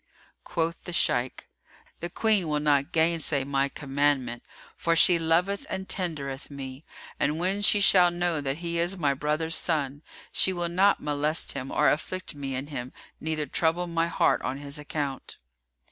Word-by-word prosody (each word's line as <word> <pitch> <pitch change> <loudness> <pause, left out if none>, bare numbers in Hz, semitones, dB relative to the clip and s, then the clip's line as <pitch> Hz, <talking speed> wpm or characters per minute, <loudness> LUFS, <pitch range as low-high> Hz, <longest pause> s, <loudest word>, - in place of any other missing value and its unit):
Quoth 170 -1 -2
the 175 - -5
Shaykh, 125 -6 +1 0.5
"The 175 - -4
Queen 210 -2 +2
will 150 -1 0
not 145 +1 +1
gainsay 160 -3 +2
my 140 0 0
commandment, 135 -4 -1 0.3
for 165 0 0
she 170 +1 +6
loveth 175 +5 +1
and 190 0 -4
tendereth 145 -7 -3
me; 135 0 -8 0.4
and 150 +2 0
when 190 +4 0
she 205 0 +5
shall 185 -3 +6
know 175 -3 -1
that 135 0 -2
he 170 0 -1
is 175 +3 0
my 145 -5 +1
brother's 150 +3 -1
son, 145 -4 0 0.3
she 190 - +2
will 175 -1 -2
not 190 +4 +3
molest 150 +2 -1
him 130 - -5
or - - +2
afflict 185 +5 -1
me 135 -2 -5
in 130 +2 -4
him 130 -4 -6 0.3
neither 155 -1 -2
trouble 165 +5 0
my 165 -1 0
heart 170 - +2
on 130 +1 -3
his 140 +1 -6
account." 145 -2 -4
155 Hz, 165 wpm, -27 LUFS, 140-175 Hz, 0.5 s, she